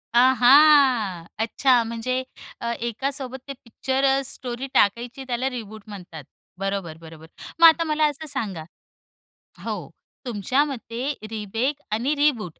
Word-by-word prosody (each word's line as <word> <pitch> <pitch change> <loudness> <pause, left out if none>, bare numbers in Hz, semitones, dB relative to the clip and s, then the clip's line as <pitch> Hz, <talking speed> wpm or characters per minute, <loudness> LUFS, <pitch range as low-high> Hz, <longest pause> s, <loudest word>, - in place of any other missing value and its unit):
आहा! 255 - +5 0.2
अच्छा 245 +2 +3
म्हणजे 235 +3 -3 0.4
अ, 235 0 -2
एकासोबत 265 +3 -4
ते 275 - -5
पिक्चर 260 +3 -2
अ, 270 0 +3
स्टोरी 250 0 -5
टाकायची 240 +6 +1
त्याला 250 +2 -1
रिबूट 220 -4 -8
म्हणतात. 180 -7 -10 0.4
बरोबर, 195 -5 -3
बरोबर, 160 0 -12 0.3
मग 335 - +10
आता 330 +1 +5
मला 310 -1 +1
असं 295 +2 -8
सांगा 195 - -3 1.0
हो, - - -5 0.4
तुमच्या 245 +5 +1
मते 255 0 -4 0.2
रिमेक 225 +7 -3
आणि 250 +8 0
रिबूट 250 - 0
245 Hz, 125 wpm, -23 LUFS, 215-275 Hz, 1.0 s, मग